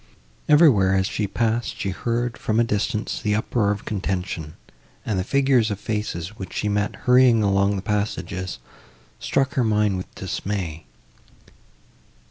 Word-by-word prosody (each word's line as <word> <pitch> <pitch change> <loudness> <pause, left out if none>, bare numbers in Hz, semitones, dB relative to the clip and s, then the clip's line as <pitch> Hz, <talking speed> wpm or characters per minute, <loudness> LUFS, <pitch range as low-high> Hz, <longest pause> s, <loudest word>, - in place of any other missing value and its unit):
Everywhere, 130 - +5
as 95 0 +2
she 105 +2 -2
passed, 115 +2 -1
she 100 - -1
heard, 120 +4 -2
from 110 +1 -1
a - - +5
distance, 110 0 -2
the 105 -2 +1
uproar 110 -1 0
of 100 0 -2
contention, 90 -6 -3 0.5
and 100 -4 -1
the - - 0
figures 135 -1 +2
and 105 - -2
faces, 105 -3 -4
which 95 -3 -7
she 105 - -2
met, 105 0 0
hurrying 125 -3 +5
along 100 0 +2
the 95 - -4
passages, 95 -3 -2 0.6
struck 135 -1 0
her 130 - +1
mind 105 -3 +2
with 90 - -8
dismay. 95 -4 -4
105 Hz, 145 wpm, -23 LUFS, 95-115 Hz, 0.6 s, Everywhere